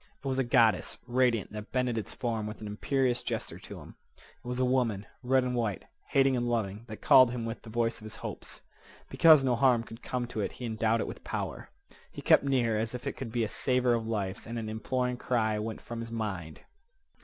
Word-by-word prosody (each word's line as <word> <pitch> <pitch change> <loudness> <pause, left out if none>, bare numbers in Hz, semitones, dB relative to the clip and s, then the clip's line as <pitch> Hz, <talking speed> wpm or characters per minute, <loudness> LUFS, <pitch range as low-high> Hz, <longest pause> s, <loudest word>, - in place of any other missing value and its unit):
It - - -4
was 130 0 0
a - - +3
goddess, 115 -6 +3
radiant, 125 -3 +1
that 105 0 -8
bended 125 -2 0
its 110 - -4
form 115 -3 -2
with 105 - -7
an 110 - -7
imperious 125 +4 0
gesture - - -4
to - - -10
him. - - -12 0.2
It - - -19
was 125 0 -2
a 130 - +3
woman, 120 -6 +1 0.2
red 130 0 +3
and 125 0 -1
white, 115 -5 -1 0.2
hating 135 -1 +3
and 120 -1 0
loving, 110 -2 -2
that 110 -2 -9
called 130 -2 +8
him 120 -1 -4
with 115 +1 -5
the 115 - -12
voice 115 0 0
of 110 - -12
his 110 - -7
hopes. - - -7 0.5
Because 155 -4 +7
no 125 -2 +2
harm 120 -1 +4
could 115 +1 -11
come 125 -1 -2
to 110 - -5
it 100 - -2
he 125 - -7
endowed 110 0 +1
it - - -3
with - - -8
power. - - -4 0.4
He - - -9
kept - - +6
near, 120 -6 +1
as 110 +2 -2
if 125 - -7
it - - -2
could 125 -3 -6
be 120 0 0
a - - 0
saver 125 +2 +1
of 115 -1 -1
lives, 100 -4 -3
and 115 +1 -4
an 110 -1 -4
imploring 125 +3 -1
cry 110 -4 0
went 110 +1 -4
from 120 -1 -7
his 115 0 -6
mind. 95 -8 -4
115 Hz, 230 wpm, -30 LUFS, 110-125 Hz, 0.5 s, called